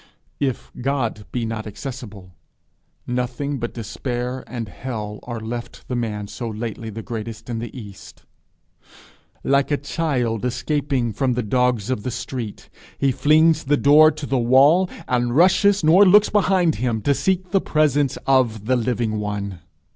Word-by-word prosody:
If 135 Hz, -4 st, -2 dB
God 120 Hz, -6 st, -2 dB
be 120 Hz, -2 st, -2 dB
not 110 Hz, -1 st, -4 dB
accessible, 105 Hz, -6 st, -8 dB, 0.7 s
nothing 125 Hz, +3 st, -2 dB
but 120 Hz, 0 st, -5 dB
despair 125 Hz, +3 st, -4 dB
and 120 Hz, -3 st, -5 dB
hell 105 Hz, -2 st, -6 dB
are 120 Hz, -2 st, -6 dB
left 120 Hz, +2 st, -7 dB
the 125 Hz, -, -1 dB
man 110 Hz, -4 st, -3 dB
so 115 Hz, +2 st, -5 dB
lately 110 Hz, 0 st, -5 dB
the 110 Hz, +1 st, -7 dB
greatest 115 Hz, 0 st, -6 dB
in 115 Hz, -, -2 dB
the 115 Hz, 0 st, -5 dB
east. 100 Hz, -3 st, -12 dB, 1.2 s
Like 140 Hz, 0 st, +2 dB
a 145 Hz, -, +1 dB
child 135 Hz, -7 st, -1 dB
escaping 125 Hz, -1 st, -1 dB
from 130 Hz, +3 st, 0 dB
the 125 Hz, 0 st, -1 dB
dogs 125 Hz, 0 st, +1 dB
of 125 Hz, -, -1 dB
the 125 Hz, -, -3 dB
street, 120 Hz, -2 st, -6 dB, 0.3 s
he 135 Hz, -, +2 dB
flings 155 Hz, +4 st, +4 dB
the 145 Hz, +2 st, +3 dB
door 150 Hz, +3 st, +7 dB
to 155 Hz, -1 st, -6 dB
the 135 Hz, -2 st, 0 dB
wall, 140 Hz, +10 st, +5 dB, 0.2 s
and 120 Hz, -1 st, 0 dB
rushes, 190 Hz, +3 st, +4 dB
nor 170 Hz, +6 st, +7 dB
looks 205 Hz, +2 st, +6 dB
behind 185 Hz, -5 st, +2 dB
him, 115 Hz, -3 st, -1 dB
to 145 Hz, -, +3 dB
seek 185 Hz, +4 st, -1 dB
the 195 Hz, -1 st, +3 dB
presence 145 Hz, -3 st, +1 dB
of 120 Hz, -6 st, +2 dB
the 130 Hz, +3 st, +2 dB
living 115 Hz, -3 st, -1 dB
one. 100 Hz, -3 st, -4 dB
125 Hz, 155 wpm, -22 LUFS, 115-145 Hz, 1.2 s, door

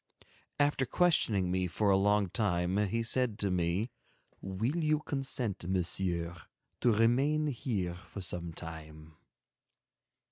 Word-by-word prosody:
After 145 Hz, -2 st, +2 dB
questioning 110 Hz, -, +3 dB
me 90 Hz, 0 st, 0 dB
for 100 Hz, +4 st, +1 dB
a -, -, +5 dB
long 100 Hz, -1 st, +2 dB
time, 90 Hz, -4 st, 0 dB
he 115 Hz, +4 st, -1 dB
said 115 Hz, -2 st, 0 dB
to 100 Hz, -4 st, 0 dB
me: 90 Hz, +6 st, 0 dB, 0.5 s
"Will 110 Hz, -, -2 dB
you 155 Hz, 0 st, +2 dB
consent, 125 Hz, -, -1 dB
Monsieur, 90 Hz, -2 st, -1 dB, 0.5 s
to 120 Hz, -, +3 dB
remain 130 Hz, +8 st, +3 dB
here 110 Hz, -10 st, -2 dB
for 90 Hz, +3 st, -10 dB
some 90 Hz, -2 st, -3 dB
time?" 80 Hz, -1 st, -9 dB
100 Hz, 120 wpm, -32 LUFS, 90-120 Hz, 0.5 s, a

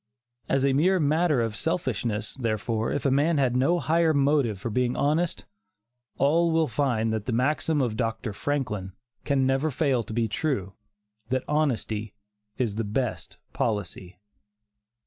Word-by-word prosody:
As 135 Hz, 0 st, +2 dB
a 135 Hz, -, +3 dB
mere 180 Hz, +7 st, +3 dB
matter 155 Hz, -2 st, +2 dB
of 115 Hz, -2 st, -2 dB
selfishness, 115 Hz, -, -2 dB
therefore, 115 Hz, -2 st, -1 dB
if 145 Hz, -, -2 dB
a 135 Hz, -, +3 dB
man 150 Hz, +4 st, +2 dB
had 130 Hz, -3 st, +2 dB
no 135 Hz, +8 st, +3 dB
higher 165 Hz, -1 st, +2 dB
motive 140 Hz, -7 st, +2 dB
for 115 Hz, -, -4 dB
being 125 Hz, +2 st, 0 dB
honest, 155 Hz, +4 st, 0 dB, 0.7 s
all 165 Hz, +5 st, +3 dB
will 160 Hz, -1 st, +2 dB
find 115 Hz, -7 st, 0 dB
that 110 Hz, 0 st, -3 dB
the -, -, 0 dB
maxim 145 Hz, +5 st, +1 dB
of 115 Hz, -4 st, -1 dB
Dr. 115 Hz, -1 st, -2 dB
Franklin 105 Hz, -7 st, -3 dB, 0.3 s
can 140 Hz, -2 st, +2 dB
never 135 Hz, +4 st, +1 dB
fail 140 Hz, -3 st, +1 dB
to 110 Hz, -, -9 dB
be 115 Hz, 0 st, +1 dB
true, 105 Hz, -, -2 dB, 0.6 s
that 130 Hz, 0 st, 0 dB
"honesty 115 Hz, -8 st, -1 dB, 0.4 s
is 115 Hz, -5 st, -1 dB
the 115 Hz, -, 0 dB
best 110 Hz, +2 st, -3 dB, 0.2 s
policy." 95 Hz, -4 st, -3 dB
130 Hz, 150 wpm, -26 LUFS, 110-150 Hz, 0.7 s, a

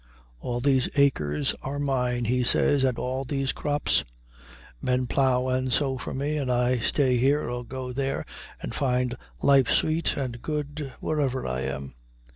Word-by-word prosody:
All 120 Hz, -, -3 dB
these 135 Hz, -1 st, +3 dB
acres 75 Hz, -, +2 dB
are 140 Hz, +2 st, -4 dB
mine, 125 Hz, -4 st, 0 dB
he 125 Hz, +3 st, +1 dB
says, 135 Hz, +3 st, +3 dB
and 130 Hz, -2 st, +2 dB
all 130 Hz, +1 st, -2 dB
these 135 Hz, 0 st, -1 dB
crops; 145 Hz, 0 st, 0 dB, 0.8 s
men 125 Hz, 0 st, +1 dB
plow 130 Hz, 0 st, +2 dB
and 130 Hz, 0 st, 0 dB
sow 135 Hz, 0 st, +1 dB
for -, -, -5 dB
me, 145 Hz, +3 st, -1 dB
and 135 Hz, -4 st, -1 dB
I 125 Hz, 0 st, +2 dB
stay 130 Hz, +1 st, +2 dB
here 140 Hz, +4 st, +2 dB
or 120 Hz, 0 st, -3 dB
go 125 Hz, 0 st, -6 dB
there, 135 Hz, +1 st, -2 dB, 0.3 s
and -, -, -6 dB
find 125 Hz, -2 st, 0 dB, 0.3 s
life 135 Hz, -3 st, +5 dB
sweet 160 Hz, +1 st, +1 dB
and 125 Hz, -4 st, -3 dB
good 150 Hz, -1 st, -4 dB
wherever 140 Hz, -4 st, 0 dB
I 65 Hz, 0 st, -2 dB
am. 65 Hz, 0 st, -4 dB
130 Hz, 160 wpm, -26 LUFS, 125-140 Hz, 0.8 s, life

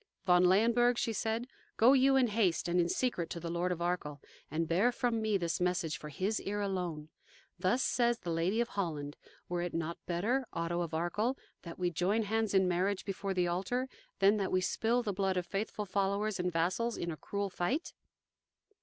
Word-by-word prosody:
"Von 180 Hz, -1 st, +5 dB
Leyenburg," 235 Hz, +6 st, +4 dB
she 230 Hz, -, 0 dB
said, 225 Hz, +3 st, -1 dB, 0.3 s
"go 240 Hz, +4 st, +7 dB
you 270 Hz, 0 st, +5 dB
in 265 Hz, -1 st, +5 dB
haste 200 Hz, -5 st, +1 dB
and 175 Hz, +1 st, +2 dB
in 170 Hz, 0 st, +2 dB
secret 210 Hz, -9 st, -1 dB
to 170 Hz, -, -5 dB
the 170 Hz, 0 st, -5 dB
Lord 175 Hz, +1 st, 0 dB
of 170 Hz, -1 st, -2 dB
Arkell, 175 Hz, -5 st, -2 dB, 0.3 s
and 160 Hz, +2 st, -1 dB
bear 190 Hz, +10 st, +3 dB
from 240 Hz, -2 st, 0 dB
me 215 Hz, -2 st, +2 dB
this 170 Hz, -1 st, -2 dB
message 180 Hz, -3 st, 0 dB
for 150 Hz, -, -8 dB
his 190 Hz, +9 st, -1 dB
ear 205 Hz, +1 st, -3 dB
alone. 180 Hz, -6 st, -3 dB, 0.5 s
Thus 195 Hz, +8 st, +2 dB
says 240 Hz, -1 st, +2 dB
the 175 Hz, -, -5 dB
Lady 170 Hz, +7 st, +1 dB
of 240 Hz, -, -1 dB
Holland: 155 Hz, -8 st, -3 dB, 0.3 s
'Were 175 Hz, 0 st, -2 dB
it 175 Hz, -1 st, -3 dB
not 165 Hz, 0 st, -3 dB
better, 225 Hz, +9 st, 0 dB
Otto 170 Hz, +1 st, -1 dB
of 165 Hz, -2 st, -3 dB
Arkell, 210 Hz, +10 st, 0 dB, 0.2 s
that 170 Hz, -1 st, -9 dB
we 180 Hz, -1 st, 0 dB
join 190 Hz, +7 st, +1 dB
hands 220 Hz, -1 st, 0 dB
in 190 Hz, -1 st, +4 dB
marriage 185 Hz, +2 st, 0 dB
before 195 Hz, 0 st, -3 dB
the 180 Hz, -1 st, +2 dB
altar, 195 Hz, +9 st, -1 dB, 0.3 s
than 200 Hz, +2 st, +4 dB
that 195 Hz, -2 st, -1 dB
we 185 Hz, -, +3 dB
spill 230 Hz, +6 st, +1 dB
the 205 Hz, -3 st, -2 dB
blood 190 Hz, -1 st, 0 dB
of 180 Hz, -, -1 dB
faithful 210 Hz, +3 st, -3 dB
followers 200 Hz, +1 st, 0 dB
and 180 Hz, 0 st, 0 dB
vassals 185 Hz, +8 st, 0 dB
in 170 Hz, -, -3 dB
a -, -, -4 dB
cruel 200 Hz, +4 st, -3 dB
fight? 250 Hz, -, -2 dB
190 Hz, 200 wpm, -32 LUFS, 175-220 Hz, 0.5 s, go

